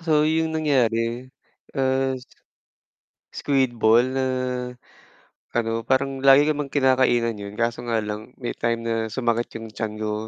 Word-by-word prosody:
So 155 -3 +2
yung 160 0 +1
nangyari, 120 -4 0 0.5
as 130 -1 0 1.1
Squid 135 -3 +1
ball 115 +3 +5
na, 130 0 0 1.3
ano, 115 -1 -1
parang 135 +1 0
lagi 135 +1 +8
namang 150 -2 -2
kinakainan 125 -4 +2
yun, 100 0 -7
kaso 120 +2 -2
nga 115 -2 0
lang 105 +3 -6
may 120 - -3
time 115 0 -1
na 115 0 -2 0.2
sumakit 120 -2 -1
yung 115 - -8
tiyan 110 0 -4
ko. 105 -1 -1
120 Hz, 135 wpm, -23 LUFS, 115-135 Hz, 1.3 s, lagi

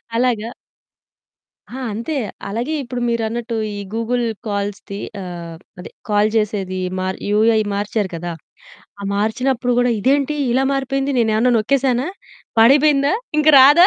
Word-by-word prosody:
అలాగా. 235 -2 +1 1.2
ఆ! 260 - -8
అంతే. 235 +9 -3 0.3
అలాగే 235 +9 -2
ఇప్పుడు 250 0 -5
మీరన్నట్టు 235 0 -2 0.2
ఈ - - -5 0.2
గూగుల్ 240 +2 0 0.2
కాల్స్‌ది 200 -1 -4 0.2
ఆహ్, 170 -2 -7 0.2
అదే - - -9 0.2
కాల్ 210 +1 +3
చేసేది 195 -3 -1 0.2
మర్ 185 0 -2
యూఐ 220 +1 +4 0.2
మార్చారు 205 -1 -1
కదా! 170 +1 -4 0.7
ఆ - - -7
మార్చినప్పుడు 245 +4 0
కూడా, 245 0 +3
"ఇదేంటి 280 +5 +2 0.2
ఇలా 260 +2 +2
మారిపోయింది, 275 0 -1
నేను 225 -2 +2
ఏమన్నా 245 +3 +3
నొక్కేసానా, 260 +4 +1 0.5
పాడైపోయిందా, 280 +5 +5 0.2
ఇంకా 305 0 +5
రాదా?" 295 +7 +8
235 Hz, 125 wpm, -19 LUFS, 205-265 Hz, 1.2 s, రాదా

